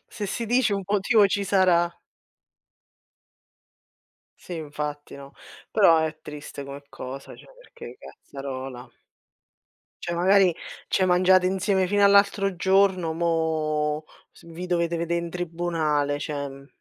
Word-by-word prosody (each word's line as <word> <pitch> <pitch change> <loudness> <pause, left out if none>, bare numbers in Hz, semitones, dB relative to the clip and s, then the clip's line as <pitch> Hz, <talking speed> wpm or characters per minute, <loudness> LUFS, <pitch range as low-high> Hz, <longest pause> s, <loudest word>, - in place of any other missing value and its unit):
Se 205 - -5
si 230 +4 -3
dice 245 -1 +2
un 195 - -3
motivo 205 +2 +3
ci 200 +1 -1
sarà. 175 -3 +2 2.4
Sì, 180 - -8
infatti 150 -1 -6
no, 140 0 -12 0.4
però 190 -6 +5
è 155 -1 -3
triste 150 -1 -9
come 140 +1 -9
cosa, 135 +2 -8
cioè - - -16
perché - - -12
cazzarola. 130 -2 -8 1.2
Cioè 170 - -3
magari 185 0 +4 0.3
ci - - 0
hai - - +3
mangiat 185 +1 +4
insieme 190 0 +1
fino 205 +1 +2
all'altro 200 -1 +4
giorno, 190 -3 +2
mo 155 -2 -1 0.3
s - - -20
vi 170 +2 -7
dovete 170 -1 0
vedé 170 +1 -2
in 170 0 -3
tribunale 165 -4 -1
cioè, 145 -1 -4
mh. 135 0 -13
170 Hz, 130 wpm, -25 LUFS, 150-190 Hz, 2.4 s, però